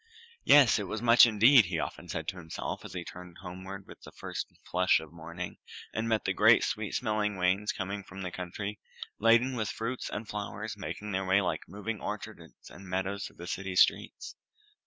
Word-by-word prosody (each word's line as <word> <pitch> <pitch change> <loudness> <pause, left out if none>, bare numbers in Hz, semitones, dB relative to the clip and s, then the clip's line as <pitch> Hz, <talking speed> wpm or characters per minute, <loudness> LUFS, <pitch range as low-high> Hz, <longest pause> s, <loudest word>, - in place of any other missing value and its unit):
Yes! 140 -7 +7
it 100 - -4
was 110 - -3
much 120 +1 +7
indeed, 115 +2 +6
he 85 -2 -2
often 85 - -4
said 80 0 -4
to 95 - -6
himself, 80 -2 -5
as - - -9
he 90 -2 -4
turned 90 -1 -10
homeward 95 +2 -8
with - - -14
the - - -12
first - - -5 0.2
flush 90 +1 +3
of 80 0 -11
morning, 85 +2 -7 0.4
and 110 +1 -2
met 110 -1 +1
the - - +1
great - - +6
sweet - - -2
smelling 105 -3 0
wains 95 +3 +1
coming 100 +1 -4
from 95 +1 -9
the 90 - -4
country, 100 +4 -5 0.4
laden 115 +4 +4
with 110 -3 -1
fruits 115 +3 -4
and 105 +1 -5
flowers, 105 +1 -5
and 105 - -13
making 105 +2 -5
their 95 0 -1
way 95 +2 +5
like 90 -3 -2
moving 105 +2 -5
orchards - - -7
and 100 - -12
meadows 95 +2 -2
through - - -16
the 85 - -9
city 95 +1 -4
streets. - - +2
100 Hz, 200 wpm, -30 LUFS, 90-110 Hz, 0.4 s, Yes